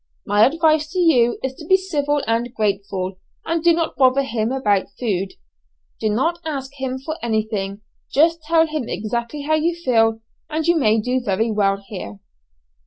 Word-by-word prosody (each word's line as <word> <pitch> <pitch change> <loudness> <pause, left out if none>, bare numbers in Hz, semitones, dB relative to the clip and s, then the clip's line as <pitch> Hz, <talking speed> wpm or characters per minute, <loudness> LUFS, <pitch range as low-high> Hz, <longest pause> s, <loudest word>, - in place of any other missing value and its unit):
My 205 +2 +5
advice 310 +1 +2
to - - -4
you 250 -9 +4
is 265 0 -2
to 315 - -10
be 380 - +6
civil 295 -6 -1
and 230 +2 0
grateful, 195 -3 -2 0.3
and 330 -1 -1
do 345 - +6
not 330 -1 -1
bother 265 +1 +4
him 225 -3 -1
about 210 -8 +1
food. 195 -5 -1 0.7
Do 220 - 0
not 325 +11 0
ask 275 -4 -4
him 260 -1 -2
for 310 +4 -5
anything, 215 -3 -2 0.3
just 330 +3 +3
tell 325 +1 +3
him 305 -6 -4
exactly 235 +6 -3
how 310 +2 0
you 325 +2 +1
feel, 225 -8 +2 0.3
and 315 0 -2
you 345 - +4
may 225 -8 +3
do 250 +4 0
very 220 +2 0
well 200 -1 +1
here." 105 - -7
255 Hz, 175 wpm, -21 LUFS, 215-315 Hz, 0.7 s, be